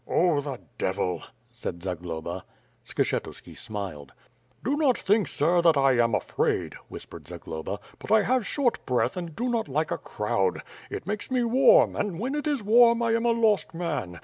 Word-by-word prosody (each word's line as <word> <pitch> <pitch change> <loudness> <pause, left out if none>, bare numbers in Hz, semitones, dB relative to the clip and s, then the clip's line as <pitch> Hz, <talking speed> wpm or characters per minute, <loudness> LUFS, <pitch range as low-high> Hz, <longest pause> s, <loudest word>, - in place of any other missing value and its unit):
"Oh, 170 -5 +2
the 140 -3 -5 0.2
devil," 90 -2 -1 0.3
said 85 0 -6
Zagloba. 85 -1 -4 0.4
Skshetuski - - -3
smiled. 95 -10 -6 0.5
"Do 275 +4 +1
not 290 -5 +3
think, 205 -2 +2
sir, 170 +4 +2
that 165 -3 +5
I 135 -1 +4
am 115 -2 +1
afraid," 95 - -1
whispered - - -9
Zagloba, 80 +5 -6 0.2
"but - - -8
I 220 -1 +6
have 250 -2 +1
short 265 -5 0
breath 125 -2 +1
and 170 -4 -6
do 245 - -2
not 235 -5 0
like 150 +3 -1
a - - -1
crowd. 105 -2 -1 0.3
It - - -5
makes 210 +1 -3
me 255 -2 +1
warm, 270 - +5
and 200 -5 -2
when 255 +5 -2
it 295 +1 -2
is 285 -7 0
warm 235 +2 +5
I 230 - +2
am 230 +1 +1
a - - +4
lost 220 -7 +2
man. 95 - -3
175 Hz, 175 wpm, -26 LUFS, -, 0.5 s, I